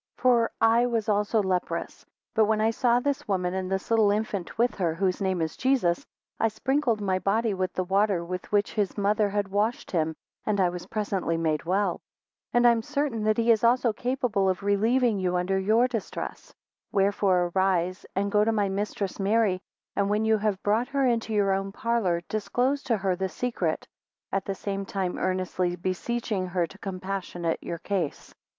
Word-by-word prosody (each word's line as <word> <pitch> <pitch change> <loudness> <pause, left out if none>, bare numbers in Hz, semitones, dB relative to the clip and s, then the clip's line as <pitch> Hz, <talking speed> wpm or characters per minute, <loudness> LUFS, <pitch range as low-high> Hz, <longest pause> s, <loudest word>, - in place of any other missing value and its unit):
19 - - -22
For 240 -2 +4
I 230 +2 +4
was 230 -3 -1
also 210 +1 +2
leprous; 185 -2 -2 0.3
but 220 -1 +4
when 215 0 +1
I 220 +1 +3
saw 240 +1 +2
this 280 +2 -2
woman, 185 -3 0
and 190 0 -3
this 190 +3 -2
little 220 -2 +5
infant 205 -3 -2
with 240 +2 +2
her, 170 -4 0
whose 185 +2 0
name 190 -3 0
is 160 - -3
Jesus, 250 -11 +1 0.4
I 225 - +3
sprinkled 250 +1 0
my 190 -2 0
body 210 +4 +1
with 185 -1 -2
the 185 - -1
water 195 -1 +1
with 180 +1 -6
which 205 0 +1
his 205 -3 -1
mother 205 +1 +2
had 200 -1 -1
washed 210 +4 -1
him 160 -2 0 0.3
and 210 -2 0
I 185 -2 +4
was 175 0 -7
presently 200 -6 -1
made 160 -1 0
well. 190 +1 0 0.5
20 - - -45
And 240 0 +6
I - - +8
am 230 -1 +1
certain 280 -3 -2
that 215 0 +2
he 230 0 +4
is 225 -1 +3
also 235 -1 +3
capable 240 -5 0
of 185 +1 -2
relieving 220 +2 +2
you 180 -1 0
under 185 +2 +1
your 220 +6 +3
distress. 245 - -5 0.4
Wherefore 195 -3 +2
arise, 185 -1 +1 0.3
go 210 0 +3
to 225 - +2
my 205 -3 +1
mistress 200 0 -3
Mary, 200 -2 +2 0.3
and 200 -1 +1
when 210 +1 +1
you 220 -1 +3
have 205 -2 -1
brought 220 +4 +2
her 275 0 +1
into 230 -2 0
your 205 -2 +2
own 195 0 -1
parlour, 200 -6 0
disclose 250 +6 0
to 230 -3 +1
her 190 -2 0
the 190 +1 -2
secret, 185 -9 -2 0.4
at 195 0 -1
the 195 - -3
same 195 0 -3
time 190 -2 -3
earnestly 185 -1 -1
beseeching 190 +2 -2
her 180 -1 0
to 200 +4 -15
compassionate 185 -3 -3
your 170 - -4
case. 175 -4 -3
200 Hz, 190 wpm, -27 LUFS, 185-225 Hz, 0.5 s, I